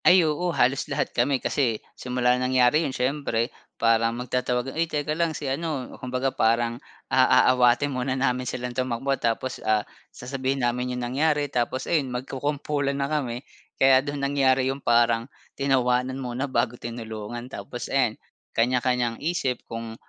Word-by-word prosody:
Ay, 180 -2 +7
oo 155 +4 0
halos 135 -5 +1
lahat - - -1
kami 130 +3 +2
kasi 125 -3 0 0.2
simula 125 -1 +1
nangyari 125 +3 +3
yun 165 - -1
siyempre 130 -3 -1 0.2
parang 115 0 +2
magtatawag 125 +1 -1
ay 165 +1 0
teka 150 0 -1
lang 165 -1 0
si 150 - -6
ano 140 -1 -3
kumbaga 130 +1 -1
parang, 115 +2 +1 0.3
ah, 130 -1 +5
aaawatin 125 +2 +4
muna 130 +1 -1
namin 125 -2 0
silang 125 +1 -4
tumakbo 130 +2 -1
tapos, 120 +2 -1
ah, 110 -1 +1 0.2
sasabihin 130 0 -2
namin 125 +1 -1
yung 125 - -2
nangyari 145 +4 +1
tapos 125 +2 -1
ayun 145 -6 +1
magkukumpulan 140 +2 -2
na 140 - 0
kami. 130 -3 -2 0.3
Kaya 135 -1 +6
dun 145 0 -4
nangyari 135 -1 +2
yung 140 - -10
parang 120 0 +3 0.2
tinawanan 130 -1 +1
muna 130 +1 -3
bago 120 -1 +1
tinulungan 115 0 -6
tapos 120 -1 -7
ayan 125 -5 +1 0.3
kanya-kanyang 125 0 +1
isip 150 -6 -1
kung, 115 0 -7
125 Hz, 150 wpm, -25 LUFS, 120-140 Hz, 0.3 s, Ay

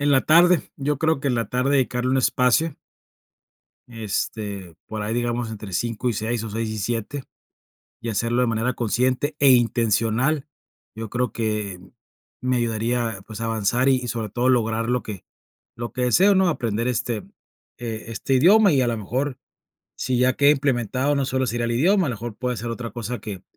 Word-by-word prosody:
En 145 0 +2
la 135 -1 +4
tarde, 170 +1 +4
yo 145 0 -2
creo 160 -3 +1
que 140 - -1
en 125 - +1
la 115 -3 -1
tarde 125 +2 0
dedicarle 125 -1 0
un 135 - +2
espacio. 130 +5 +2 1.1
Este, 105 -5 -4
por 110 - -5
ahí 105 +2 -2
digamos 120 -1 -1
entre 105 -3 -8
5 120 +4 -1
y - - -1
6 110 +2 -2
o 110 - -6
6 115 +1 -2
y 110 - -4
7, 120 +6 -3 0.8
y 115 - -5
hacerlo 115 +2 0
de 125 - +3
manera 115 +3 0
consciente 125 +6 0
e 140 -1 +6
intencional, 120 +4 +2 0.5
yo 110 -1 -6
creo 125 -1 -1
que 105 -4 -2 0.6
me 130 0 0
ayudaría 115 -2 -1
pues, 110 0 -8
a - - -1
avanzar 115 +4 +1
y 130 -2 +1
sobre 115 -3 -3
todo 120 +4 0
lograr 115 -2 +1
lo 125 0 +1
que 105 -4 -8 0.5
lo 120 0 -5
que 125 - -1
deseo, 190 - +4
¿no? 190 -1 +4
Aprender 115 -5 -1
este, 120 -1 -1 0.6
eh, 115 -4 -5
este 115 +4 -2
idioma 195 +8 +6
y 135 - +3
a 125 - +1
lo 115 -1 0
mejor, 130 +6 -2 0.6
si 125 -1 -1
ya 125 0 +3
queda 140 0 +5
implementado, 135 -1 +1
no 140 -1 +1
solo 130 0 0
sería 120 0 -1
el 120 - -1
idioma, 180 - +3
a 130 - -1
lo - - -3
mejor 115 0 -6
puede 125 0 -2
ser 115 +3 -4
otra 115 0 -5
cosa 120 +1 -5
que 100 -4 -7
120 Hz, 190 wpm, -23 LUFS, 115-130 Hz, 1.1 s, e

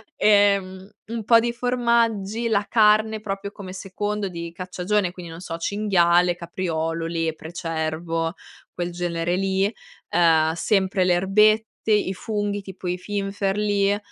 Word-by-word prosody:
e, 205 -1 +5
mhmm, 190 0 -11 0.2
un 230 -1 -4
po' 230 +1 +6
di 235 +1 0
formaggi, 235 -3 0
la 210 -3 +1
carne, 215 0 +4
proprio 200 -1 -5
come 190 -3 -9
secondo 205 +2 -3
di 170 -1 -6
cacciagione, 180 +2 -1
quindi, 175 -2 -9
non 165 - -9
so: 165 -2 -5
cinghiale, 175 -2 +2
capriolo, 165 -2 -3
lepre, 165 -1 -3
cervo, 165 0 -2 0.4
quel 175 0 -3
genere 175 0 -2
lì, 195 +2 0 0.4
ehm, 160 -2 +3
sempre 190 +2 +1
le 180 - +4
erbette, 215 +4 +2
i 210 -2 +2
funghi, 205 +1 -3
tipo 190 -1 -8
i 180 0 -1
finferli. 200 +1 0
190 Hz, 135 wpm, -23 LUFS, 175-210 Hz, 0.4 s, po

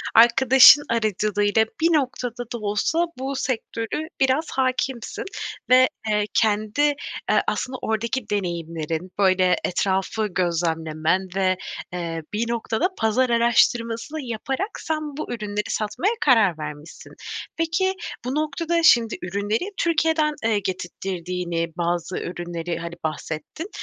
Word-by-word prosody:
arkadaşın 255 +4 +8
aracılığıyla 215 -1 +1 0.2
bir 330 - +5
noktada 250 -4 -1
da - - -2
olsa 215 +11 0
bu 270 +2 -3
sektörü 260 +2 -3
biraz 270 +4 +2
hâkimsin 260 - -1 0.5
ve, 255 +1 +7 0.2
eee, 210 -1 +2
kendi, 215 +3 +1
eee, 290 -1 0
aslında 260 0 -2
oradaki 220 +1 -2
deneyimlerin, 170 -3 -3
böyle, 185 -2 +4
etrafı 195 +4 0
gözlemlemen 170 -1 0
ve, 185 -1 +2 0.4
eee, 165 -2 -3
bir 230 +2 -1
noktada 235 +7 0
pazar 225 +4 +2
araştırmasını 235 +4 +2
yaparak 265 - -3
sen 315 -1 -2 0.2
bu 305 - -4
ürünleri 210 -2 -3
satmaya 220 - 0
karar 220 - +5
vermişsin. 150 0 -9 0.4
Peki, 330 +4 +1 0.3
bu 255 +2 -2
noktada, 315 +3 0
şimdi, 235 -7 +5
ürünleri 205 - -2
Türkiye'den, 320 -2 +2
eee, 220 -2 +2
getirttirdiğini, 180 -2 -4
eee, 165 0 -2
bazı 175 +1 -1
ürünleri, 175 -1 -4
hani, 170 0 -6
bahsettin. 155 - -5
220 Hz, 115 wpm, -23 LUFS, 180-265 Hz, 0.5 s, arkadaşın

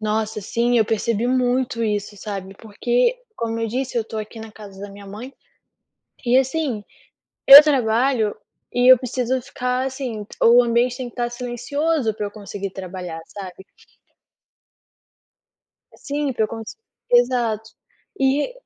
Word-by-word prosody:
Nossa, 215 0 -2
sim, 235 +4 +1
eu 220 - +4
percebi 225 +1 -1
muito 250 -1 0
isso, 205 -1 -2
sabe? 195 -2 -6
Porque 240 - 0 0.2
como 230 0 -3
eu 225 - 0
disse 255 +3 -3
eu 235 - +2
estou 220 0 -7
aqui 215 +2 -7
na 220 0 -9
casa 200 -3 -12
da 205 - -7
minha 200 0 -12
mãe, 220 +7 -9 0.9
e 245 +1 +4
assim, 265 -4 0 0.6
eu 280 +2 +13
trabalho 245 -5 +1 0.4
e 245 +1 +7
eu - - +8
preciso 255 +1 -2
ficar, 250 +1 -2
assim, 255 -5 -5 0.2
o 240 +1 +7
ambiente 240 +1 +1
tem 255 - -4
que - - -15
estar 240 -1 -2
silencioso 250 +2 -2
para 210 0 -3
eu - - -6
conseguir 200 -1 -7
trabalhar, 185 -3 -7
sabe? 190 -1 -10 2.3
Assim 285 -1 -3
que 230 - -1
eu 215 - +1
cons 225 -1 -8 0.3
exato. 240 -3 +2 0.5
E 275 - +1
235 Hz, 145 wpm, -21 LUFS, 210-255 Hz, 2.3 s, eu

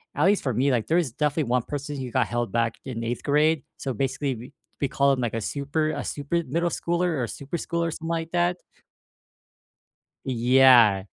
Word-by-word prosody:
at 145 - +2
least 200 +1 +3
for 130 - -1
me, 130 +5 +2
like, 115 -4 0
there 165 - +2
is 165 -8 0
definitely 150 -1 0
1 125 0 +2
person 145 +2 -5
who 130 -2 -5
got 130 -1 +2
held 120 0 -2
back 115 -1 0
in 120 -4 -5
8th 115 +1 -3
grade, 150 0 +2
so 135 - -3
basically, 135 +3 -1
we 120 +5 -11 0.3
we 140 - +1
call 140 0 +3
him 130 - -2
like 120 -2 -2
a 115 - -1
super 145 +7 -1
a 145 -2 -4
super 150 +4 -2
middle 170 +1 -1
schooler, 175 +1 -1
or - - 0
a - - -2
super 140 +8 -6
schooler 170 +1 -2
or - - -2
some 165 +1 -6
like 165 0 -2
that? 175 0 +1 1.7
Yeah. 120 -5 +5
140 Hz, 210 wpm, -25 LUFS, 125-160 Hz, 1.7 s, Yeah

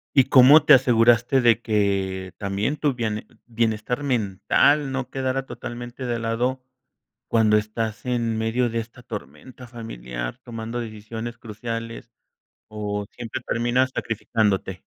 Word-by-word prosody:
¿Y 135 - +7
cómo 140 +4 +7
te - - +8
aseguraste 120 0 +4
de 120 -2 +4
que 95 -3 -1
también 100 +7 -2
tu 145 -2 0
biene 110 -3 -3 0.2
bienestar 115 +2 -1
mental 130 +4 +2
no 130 -2 -3
quedara 135 0 -2
totalmente 120 +1 -7
de 120 -1 -1
lado 120 +3 -1 0.6
cuando 110 -2 +4
estás 110 +1 -3
en 120 -3 0
medio 115 +2 0
de 115 - -3
esta 120 +2 -9
tormenta 125 +3 -9
familiar 60 - -6
tomando 115 0 -5
decisiones 115 +1 -7
cruciales, 115 +1 -6 0.6
o 105 -1 -3
siempre 120 +2 -6
terminas 120 +2 +1
sacrificándote? 100 -4 -1
115 Hz, 125 wpm, -23 LUFS, 110-125 Hz, 0.6 s, te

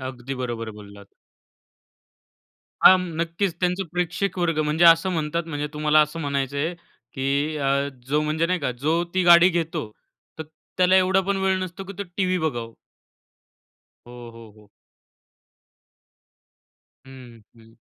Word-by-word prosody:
अगदी 130 0 -6
बरोबर 115 -2 -4
बोललात. 100 -1 -14 1.7
हा, 185 - +9
नक्कीच. 170 +1 -3
त्यांचं 180 +1 0
प्रेक्षक 180 +2 -2
वर्ग. 165 -3 0
म्हणजे 155 +3 +1
असं 165 +2 +6
म्हणतात 165 -1 -2
ना, - - -9
म्हणजे 145 -1 -3
तुम्हाला 150 0 +3
असं 150 +2 -1
म्हणायचंय, 140 +2 -2 0.4
की 140 +3 -1
अ, 140 0 0 0.2
जो 150 +3 +1
म्हणजे 155 +2 0
नाही 180 +1 0
का 140 -3 -1
जो 160 +3 +1
ती 185 - +2
गाडी 175 +1 +7
घेतो 165 - -3 0.5
तर - - -3 0.3
त्याला 185 +1 +4
एवढा 190 +1 +3
पण 200 0 0
वेळ 190 0 +1
नसतो, 185 +1 -6
की 195 - -9
तो - - -2
टीव्ही 185 -2 0
बघावं. 120 -8 -3 1.3
हो, 120 -1 -11
हो, 115 -1 -13
हो. 105 -1 -21 2.4
हं, 125 -3 -13 0.2
हं. 115 0 -20
155 Hz, 140 wpm, -23 LUFS, 135-180 Hz, 2.4 s, हा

